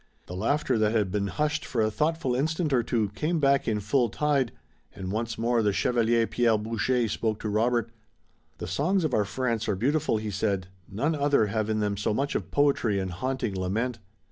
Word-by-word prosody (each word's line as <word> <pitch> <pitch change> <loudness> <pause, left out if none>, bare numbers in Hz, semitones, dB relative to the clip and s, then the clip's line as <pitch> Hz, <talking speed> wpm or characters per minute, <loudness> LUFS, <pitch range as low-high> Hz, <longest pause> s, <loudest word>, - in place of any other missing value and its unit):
The 90 - -8
laughter 115 +4 +1
that 110 0 +2
had 105 -5 +1
been 100 0 0
hushed 150 - -1
for 125 - -3
a 110 -1 +2
thoughtful 150 0 0
instant 155 +3 0
or 125 - +4
two 115 -3 0
came 155 - -1
back 140 -1 +3
in 110 -2 +1
full 120 +4 +1
tide, 140 -1 +1 0.4
and 95 -2 -5
once 115 +2 -2
more 115 +1 +1
the 105 -1 +2
Chevalier 115 +2 +2
Pierre 115 -1 +2
Boucher 115 +3 0
spoke 110 0 -1
to 110 - -2
Robert. 115 +2 +1 0.7
"The - - -5
songs 185 +6 0
of 155 -5 -1
our 105 - +2
France 115 0 -2
are 105 - +1
beautiful," 135 +3 +1
he 105 -1 -4
said. 100 -2 -1 0.2
"None 140 +11 0
other 145 -6 +2
have 110 +1 -1
in 110 -1 0
them 105 -1 -1
so 105 +1 0
much 140 +3 -1
of - - -3
poetry 140 -8 +2
and 95 -1 -2
haunting 125 +2 -2
lament." 110 +6 -2
115 Hz, 200 wpm, -27 LUFS, 105-135 Hz, 0.7 s, or